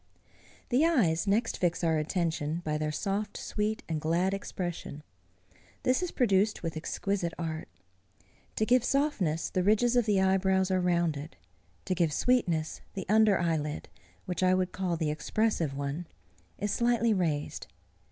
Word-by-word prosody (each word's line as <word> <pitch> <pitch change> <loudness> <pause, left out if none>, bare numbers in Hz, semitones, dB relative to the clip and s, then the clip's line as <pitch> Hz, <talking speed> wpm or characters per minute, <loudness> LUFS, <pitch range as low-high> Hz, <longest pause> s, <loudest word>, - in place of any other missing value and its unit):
The 260 +4 +3
eyes 210 - +2
next 220 +3 +1
fix 175 -1 0
our 160 -2 +2
attention 160 -1 -1
by 150 -1 -1
their 155 0 -1
soft, 200 +6 -2
sweet, 215 +1 -2
and 160 -2 -2
glad 170 +5 +1
expression. 175 -6 -5 0.8
This 255 +6 +2
is 360 - -1
produced 210 -6 +2
with 165 -1 -3
exquisite 175 +2 -2
art. 160 -2 -4 0.9
To 215 - +1
give 245 +1 +4
softness, 245 - 0
the 185 - +1
ridges 220 +5 +3
of 240 -2 +3
the 205 -2 +3
eyebrows 190 0 +2
are 185 -1 +2
rounded. 170 -4 0 0.5
To - - 0
give 170 -3 +1
sweetness, 175 -11 +1
the 190 - -4
under 215 -2 +5
eyelid, 155 -3 -2 0.4
which 180 -1 -3
I 185 0 +4
would 185 -1 0
call 180 -3 -2
the 155 -2 0
expressive 165 -3 -1
one, 140 +4 -3 0.5
is 205 +1 -2
slightly 235 -1 +2
raised. 160 -7 -2
185 Hz, 150 wpm, -29 LUFS, 160-210 Hz, 0.9 s, under